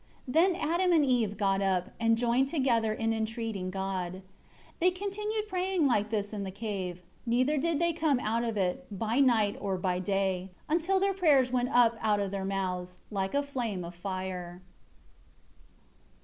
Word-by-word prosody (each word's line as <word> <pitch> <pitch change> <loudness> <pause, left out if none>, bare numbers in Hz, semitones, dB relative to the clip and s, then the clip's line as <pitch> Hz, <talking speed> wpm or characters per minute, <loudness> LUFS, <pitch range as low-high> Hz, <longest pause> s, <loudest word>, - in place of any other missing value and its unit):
5 255 - -6
Then 345 +3 +4
Adam 350 +2 +1
and 310 -3 +4
Eve 230 -6 +1
got 195 -1 +1
up, 185 -2 0
and 230 0 +3
joined 245 +3 +2
together 250 -7 +1
in 225 +1 0
entreating 220 -3 -3
God. 190 -2 -3
6 190 +1 -10 0.6
They 360 - +5
continued 420 +3 -3
praying 370 -3 0
like 215 -5 +2
this 210 -1 -2
in 205 - -3
the 195 - -4
cave; 190 -3 -5 0.2
neither 255 +5 +2
did 330 +1 +1
they 340 +2 +1
come 310 -5 +1
out 230 0 0
of 225 -2 -2
it, 180 -2 -1
by 220 +5 -1
night 225 -7 +3
or 195 -2 -1
by 180 0 -1
day, 190 -1 -1 0.2
until 345 +5 +2
their 395 +1 +2
prayers 290 -9 +3
went 250 0 +1
up 240 -3 +4
out 210 -2 +2
of 200 -1 -2
their 195 -1 -3
mouths, 180 -2 -3
like 195 +3 -2
a 285 - +2
flame 235 -10 -3
of 170 - -8
fire. 185 -1 -5
225 Hz, 175 wpm, -29 LUFS, 195-280 Hz, 0.6 s, They